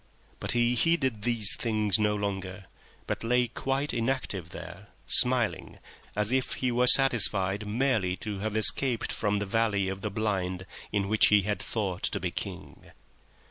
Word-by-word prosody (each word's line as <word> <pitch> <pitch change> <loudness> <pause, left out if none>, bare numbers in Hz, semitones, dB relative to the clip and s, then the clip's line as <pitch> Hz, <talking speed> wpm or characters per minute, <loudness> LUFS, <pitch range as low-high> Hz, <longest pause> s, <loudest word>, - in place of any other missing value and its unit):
But - - -1
he 120 0 +1
heeded 130 -6 0
these 115 -2 +2
things 110 -3 0
no 105 -1 +1
longer, 95 -2 -5 0.4
but - - -4
lay 125 +1 +1
quite 135 +4 -3
still 120 -4 -3
there, 85 - -11 0.2
smiling 125 -3 +2 0.4
as 105 +2 0
if 130 -1 0
he 130 -1 -2
were 125 +1 +1
content 105 -6 +1
now 105 - -8
merely 110 -6 0
to 105 0 -6
have 110 +1 -3
escaped 120 +2 +2
from 105 -1 -1
the 100 - -3
valley 100 -2 0
of 95 0 -6
the 105 - -3
Blind, 95 -3 -3 0.3
in 100 -2 -1
which 110 +1 +4
he 105 -1 +4
had 105 +1 -3
thought 100 -6 -4
to - - -2
be - - -4
King. - - -9
105 Hz, 165 wpm, -27 LUFS, 100-120 Hz, 0.4 s, which